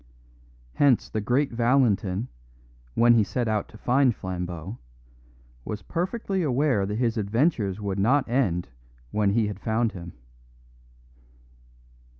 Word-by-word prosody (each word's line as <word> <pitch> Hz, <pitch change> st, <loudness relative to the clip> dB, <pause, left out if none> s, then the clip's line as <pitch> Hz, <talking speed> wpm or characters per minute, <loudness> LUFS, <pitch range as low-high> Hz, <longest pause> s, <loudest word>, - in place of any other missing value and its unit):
Hence 135 Hz, -, +3 dB
the 110 Hz, -, -1 dB
great 130 Hz, +7 st, +1 dB
Valentin, 115 Hz, -4 st, +1 dB, 0.7 s
when 120 Hz, 0 st, +6 dB
he 115 Hz, -2 st, +4 dB
set 120 Hz, +3 st, -2 dB
out 110 Hz, -2 st, 0 dB
to -, -, -13 dB
find 125 Hz, 0 st, +2 dB
Flambeau, 90 Hz, +2 st, -5 dB, 0.8 s
was 105 Hz, -, -6 dB
perfectly 190 Hz, +2 st, -2 dB
aware 135 Hz, -, +1 dB
that 105 Hz, -, -3 dB
his 120 Hz, -1 st, 0 dB
adventures 110 Hz, -, 0 dB
would 100 Hz, -2 st, -3 dB
not 130 Hz, +8 st, +3 dB
end 110 Hz, -9 st, 0 dB, 0.4 s
when 105 Hz, -2 st, +2 dB
he 115 Hz, 0 st, +2 dB
had 105 Hz, -2 st, -5 dB
found 110 Hz, +1 st, 0 dB
him. 85 Hz, -3 st, -9 dB
110 Hz, 125 wpm, -26 LUFS, 100-130 Hz, 0.8 s, when